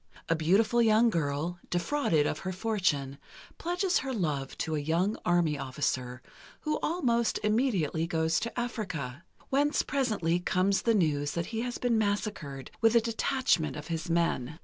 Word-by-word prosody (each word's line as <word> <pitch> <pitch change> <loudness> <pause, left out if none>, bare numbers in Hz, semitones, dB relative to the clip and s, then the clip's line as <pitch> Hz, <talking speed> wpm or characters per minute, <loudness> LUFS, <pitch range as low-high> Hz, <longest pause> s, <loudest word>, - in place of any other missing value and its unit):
A 165 - +3
beautiful 205 +9 +3
young 225 +1 +4
girl, 160 +1 -2
defrauded 175 - +1
of - - -1
her 185 - -4
fortune, 180 -9 -1 0.4
pledges 355 +2 +1
her 270 - -4
love 150 - -2
to 160 - -2
a - - 0
young 170 +8 0
army 170 -4 +2
officer, 130 -2 -2 0.4
who 305 0 -1
almost 235 -9 +1
immediately 210 - +1
goes 160 -1 +1
to 235 +1 -4
Africa, 170 - -4 0.3
whence 290 +2 +2
presently 215 - 0
comes 185 +2 +1
the 230 -1 +2
news 145 -6 +1
that 170 -1 -2
he 225 - -1
has 245 0 -3
been 235 -3 +1
massacred 205 -10 -2
with 225 0 +4
a 235 - +6
detachment 225 - 0
of 150 +3 -8
his 165 0 -3
men. 165 -3 0
180 Hz, 155 wpm, -29 LUFS, 155-230 Hz, 0.4 s, a